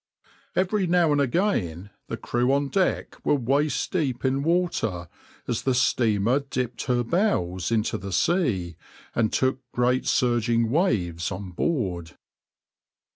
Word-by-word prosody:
Every 190 +1 +1
now 170 -2 +3
and 145 -1 +3
again 110 - -1 0.2
the - - -4
crew 120 +2 0
on 140 0 +1
deck 190 +2 -1
were - - +3
waist 140 +3 0
deep 140 -8 -1
in 135 +1 +1
water, 145 - 0 0.4
as 120 - -1
the 130 -2 +1
steamer 120 -1 +2
dipped 125 -3 -4
her 125 -2 +1
bows 105 - 0
into 110 -1 0
the 100 +2 -6
sea 95 - 0 0.4
and 110 -2 +1
took 130 0 +1
great 125 +1 +1
surging 115 -2 +2
waves 95 - 0
on 95 0 -6
board. 90 - -2
125 Hz, 130 wpm, -25 LUFS, 100-145 Hz, 0.4 s, now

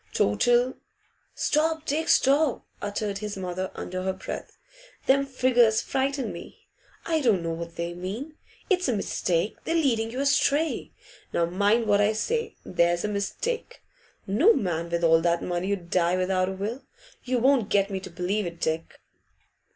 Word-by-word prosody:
Total 245 - +3 0.6
'Stop, 320 +1 +1
Dick, 315 +3 -1
stop!' 280 0 +3 0.2
uttered 205 0 -3
his 210 -1 -5
mother, 185 0 -3
under 185 +1 -4
her 190 0 -1
breath. 190 - -7 0.5
'Them 275 +1 +3
figures 245 -4 +3
frighten 270 0 -1
me; - - -11 0.4
I 320 -2 +1
don't 215 -10 +2
know 165 - -2
what 170 0 -6
they 170 0 -3
mean. 200 - -6 0.3
It's 365 -4 +2
a 245 - +1
mistake; 180 -1 -1
they're 330 - -1
leading 235 -9 +2
you 250 +3 -5
astray. 280 +3 +1 0.4
Now, 170 - +2
mind 205 +6 +2
what 205 -1 +3
I 210 +1 +3
say 460 - -2
there's 170 +2 +1
a - - -1
mistake! 455 - -3 0.4
No 285 - +5
man 170 -3 -2
with 170 0 -1
all 165 0 +5
that 170 0 +1
money 180 +2 -2
'ud 180 -4 -4
die 180 0 +2
without 185 0 +1
a - - -3
will. 215 +7 -4 0.4
You 255 0 0
won't 250 -3 +3
get 200 0 +2
me 190 - -2
to 190 - -9
believe 180 +3 -1
it, 170 0 -8
Dick. 160 0 -3
205 Hz, 165 wpm, -26 LUFS, 180-265 Hz, 0.6 s, No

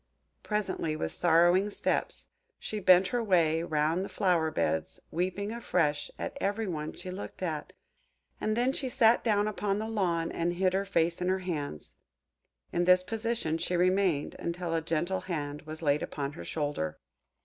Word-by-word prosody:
Presently, 190 -7 -1
with 80 - -2
sorrowing 175 +4 +4
steps, - - -2 0.3
she 215 - -4
bent 185 -1 +6
her 245 -2 0
way 165 -6 +3
round 160 +2 +1
the - - -6
flower 175 -6 +2
beds, 80 - -1
weeping 185 +4 -1
afresh 150 -10 0
at - - -4
every 205 +3 0
one 155 -5 -3
she 185 - -7
looked 190 0 -7
at; 155 -4 -3 0.7
and 215 +1 0
then 250 +2 +2
she 270 -2 -2
sat 240 -3 +4
down 210 -2 +2
upon 205 -1 -1
the 215 +1 -3
lawn, 175 -7 0
and 170 +1 -1
hid 185 +1 +1
her 195 +1 +1
face 170 -3 +1
in 180 - +1
her 190 - +2
hands. 145 - -4 0.8
In 175 0 +2
this 180 0 +6
position 225 -6 -1
she 175 +1 0
remained, 185 -4 +2
until 170 0 -3
a 165 - +1
gentle 165 +4 -1
hand 150 -5 -4
was 155 +1 -7
laid 145 0 +2
upon 140 -1 -3
her 165 - -8
shoulder. 145 - -2
180 Hz, 170 wpm, -30 LUFS, 160-200 Hz, 0.8 s, bent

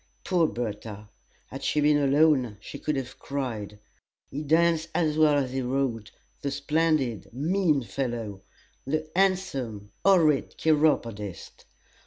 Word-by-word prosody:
Poor 175 -4 +2
Bertha! 105 -3 -5 0.4
had - - -7
she 150 - +1
been 150 0 +4
alone 140 -5 +3
she - - -9
could 150 - -1
have 130 -1 -5
cried. 115 -7 -4 0.5
He 145 - -4
danced 165 +2 +2
as 155 -3 +1
well 155 -1 +4
as 135 -3 0
he 135 0 -2
rode 125 -4 -1 0.3
the 140 - -1
splendid, 140 - 0
mean 155 - +1
fellow! 115 -6 -4 0.5
the 155 +2 -1
handsome, 135 - 0
horrid 165 -8 +3
chiropodist! 115 - 0
140 Hz, 125 wpm, -27 LUFS, 120-155 Hz, 0.5 s, been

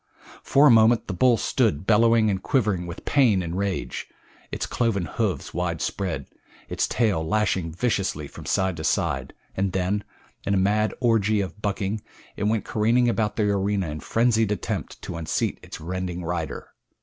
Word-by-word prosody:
For 140 +2 +4
a 145 - +8
moment 115 0 +5
the 100 - -4
bull 120 +6 +4
stood 75 -4 0
bellowing 115 0 +4
and 95 -1 -2
quivering 100 -9 0
with 85 - -8
pain 115 -10 +3
and 85 0 -4
rage, 100 0 -3 0.4
its - - -2
cloven 110 -7 0
hoofs 75 - -2
widespread, 90 +1 -2 0.4
its - - 0
tail 105 -9 +1
lashing 95 -2 0
viciously 90 -5 -1
from - - -11
side 95 -2 +1
to 80 - -5
side, 80 - -1 0.2
and 95 -1 -1
then, 95 +2 0 0.4
in 100 - 0
a - - +2
mad 105 +3 +1
orgy 110 -4 +2
of 95 +1 -4
bucking 100 0 -2 0.3
it 100 - -2
went 110 0 0
careening 120 +3 +2
about 110 -2 0
the 110 - +1
arena 100 -3 0
in 75 +1 -5
frenzied 115 +4 +2
attempt 105 - -3
to 85 - -5
unseat 80 -3 -2
its - - -9
rending 90 +1 -4
rider. 85 -1 -4
100 Hz, 165 wpm, -24 LUFS, 90-110 Hz, 0.4 s, a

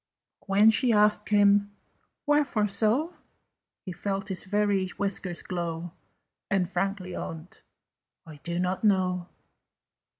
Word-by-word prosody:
But - - -28
when 205 +3 +6
she 240 +2 +2
asked 210 -1 +3
him 205 0 +3 0.5
"Wherefore 290 -8 +2
so?" 230 - 0 0.7
He 185 - -5
felt 195 +3 -4
his 190 0 -4
very 205 -1 +1
whiskers 195 -3 -2
glow, 170 -1 -4 0.6
And 195 -2 +1
frankly 185 0 -3
owned 165 +2 -8 0.6
"I 155 -2 -11
do 170 +3 -4
not 185 +2 -1
know." 185 -3 +1
195 Hz, 120 wpm, -27 LUFS, 180-210 Hz, 0.7 s, when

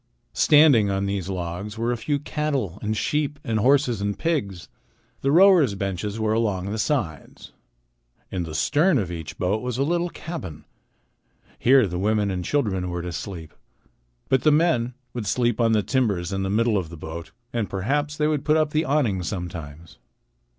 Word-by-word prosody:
Standing 145 -9 +5
on 100 0 -1
these 100 -2 -3
logs 90 +3 -5
were 115 +2 0
a - - 0
few 145 +6 -1
cattle 140 - -2
and 110 +1 -2
sheep 150 +2 -1
and 110 -1 -1
horses 125 -2 +3
and 100 0 -2
pigs. 125 - -2 0.5
The 135 - +1
rowers' 170 - +6
benches 100 +2 -3
were 110 0 +1
along 100 -4 -1
the 110 - -3
sides. 100 - -3 0.8
In 90 - -2
the 80 -2 -5
stern 155 - +3
of 95 -7 -2
each 80 -2 -7
boat 100 +4 0
was 125 -1 -3
a 135 - +2
little 175 +3 0
cabin. 95 - -7 0.9
Here 130 0 +5
the 90 -2 -4
women 105 0 +1
and 90 -1 -3
children 95 -8 -1
were 85 -1 -4
to 90 - -4
sleep. 85 -3 -7 0.7
But 130 -1 +2
the 155 - +4
men 145 -6 +2 0.2
would 115 -4 -4
sleep 120 +1 +1
on 115 -1 +3
the 105 -2 +2
timbers 100 -10 0
in 95 - -1
the 95 - -2
middle 110 0 +2
of 85 -4 -6
the 85 - -10
boat 80 +1 -7 0.2
and 115 -4 -1
perhaps 145 +10 -1
they 150 - +2
would 150 -3 0
put 155 +1 +3
up 155 -1 +1
the 155 +2 +1
awning 130 -10 +1
sometimes. 85 -4 -7
110 Hz, 180 wpm, -24 LUFS, 95-140 Hz, 0.9 s, rowers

